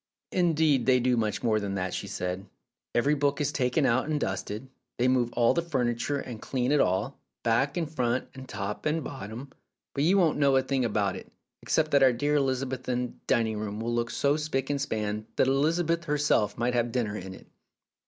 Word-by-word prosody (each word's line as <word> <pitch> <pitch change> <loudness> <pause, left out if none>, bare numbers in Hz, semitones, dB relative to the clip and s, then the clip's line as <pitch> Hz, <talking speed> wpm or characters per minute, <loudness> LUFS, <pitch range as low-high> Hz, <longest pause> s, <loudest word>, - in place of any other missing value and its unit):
"Indeed, 160 -7 +2
they 130 -1 +5
do 125 0 +2
much 110 -3 -1
more 110 -2 +2
than 100 -1 -3
that," 95 -1 -2
she - - -4
said. 90 +2 -4 0.5
"Every 140 +5 +3
book 145 -1 +1
is 150 - 0
taken 130 +2 +1
out 130 +2 +2
and 150 -1 0
dusted; 105 +3 -3 0.3
they 125 - +2
move 125 -2 +2
all 120 -1 +3
the 170 - +1
furniture, 130 -3 -1
and 120 -5 -6
clean 125 0 -1
it 150 - +4
all, 95 +9 0 0.2
back 130 +7 +1
and 165 -2 0
front 130 -4 -1
and 130 -1 -10
top 105 +5 -4
and 155 +1 0
bottom. 125 +1 -7 0.4
But 140 - 0
you 185 +5 +4
won't 165 -6 +3
know 140 -2 +4
a 130 - +4
thing 130 -1 0
about 105 -3 0
it, - - -12 0.3
except 155 -1 +1
that 140 - +5
our 130 -2 +6
dear 145 +5 0
Elizabethan 130 -2 -2
dining 110 -2 +1
room 105 0 -4
will 115 +1 -2
look 120 0 0
so 140 +1 +1
spick 145 -3 -2
and 140 -1 -1
span 110 -4 -2
that - - +3
Elizabeth 165 +5 +1
herself 145 -9 +1
might 120 +1 0
have 120 -1 +1
dinner 115 -5 -1
in 95 -1 -7
it. - - -15
130 Hz, 200 wpm, -28 LUFS, 115-145 Hz, 0.5 s, our